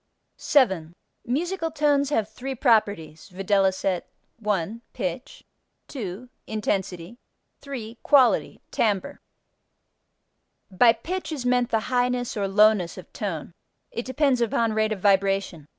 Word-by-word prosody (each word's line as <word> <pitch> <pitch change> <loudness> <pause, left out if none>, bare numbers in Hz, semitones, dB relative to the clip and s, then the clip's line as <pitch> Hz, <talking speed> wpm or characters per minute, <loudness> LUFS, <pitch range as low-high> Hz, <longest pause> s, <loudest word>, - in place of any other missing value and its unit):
7. 190 - +2 0.3
Musical 330 +6 -1
tones 290 -3 +2
have 225 -8 +1
three 260 +5 -6
properties, 205 - +1
viz.: 190 -1 +1 0.4
1. 210 0 -2
Pitch. - - -5 0.5
2. 220 -2 -6 0.2
Intensity. 195 -1 -3 0.4
3. 240 -5 -7
Quality 270 -4 +3
(timbre). 205 -4 0 1.5
By 230 +5 +5
pitch 345 +11 -5
is 280 -5 -4
meant 245 -1 +2
the 225 -2 +1
highness 245 0 0
or 200 -2 -1
lowness 205 -3 +3
of 185 - -12
tone. 175 -5 -4 0.4
It 235 - -4
depends 260 -1 +1
upon 230 -1 +1
rate 215 0 +1
of 215 - -2
vibration. 195 -5 +1
220 Hz, 115 wpm, -25 LUFS, 195-250 Hz, 1.5 s, By